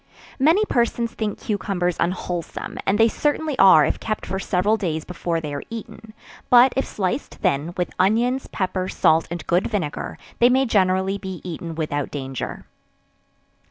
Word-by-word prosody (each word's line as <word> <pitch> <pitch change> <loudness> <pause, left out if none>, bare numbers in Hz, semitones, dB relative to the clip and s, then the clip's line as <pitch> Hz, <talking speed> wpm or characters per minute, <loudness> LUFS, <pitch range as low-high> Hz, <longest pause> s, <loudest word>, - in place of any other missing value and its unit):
Many 330 +10 +4
persons 235 - 0
think 215 -2 -3
cucumbers 185 -4 -1
unwholesome, 175 -1 -3
and 195 - +3
they 225 +1 +6
certainly 295 +4 -1
are 185 -6 +8
if - - -1
kept 215 -1 -3
for 190 - -3
several 195 +3 +1
days 165 -7 -3
before 170 -2 -2
they 150 -2 -5
are 140 - -3
eaten; 225 -1 -9 0.3
but 245 +1 +7
if 270 - 0
sliced 210 +7 -3
thin, 170 -2 -1
with 180 - -2
onions, 235 +7 +2
pepper, 185 -1 -2
salt 160 +1 +3
and 170 -2 -5
good 175 +3 +1
vinegar, 190 -10 -3 0.2
they 240 - +6
may 260 +2 +3
generally 190 -2 +1
be 190 -3 -6
eaten 165 -2 -6
without 145 -3 -2
danger. 135 -3 -5
190 Hz, 160 wpm, -22 LUFS, 170-225 Hz, 0.3 s, are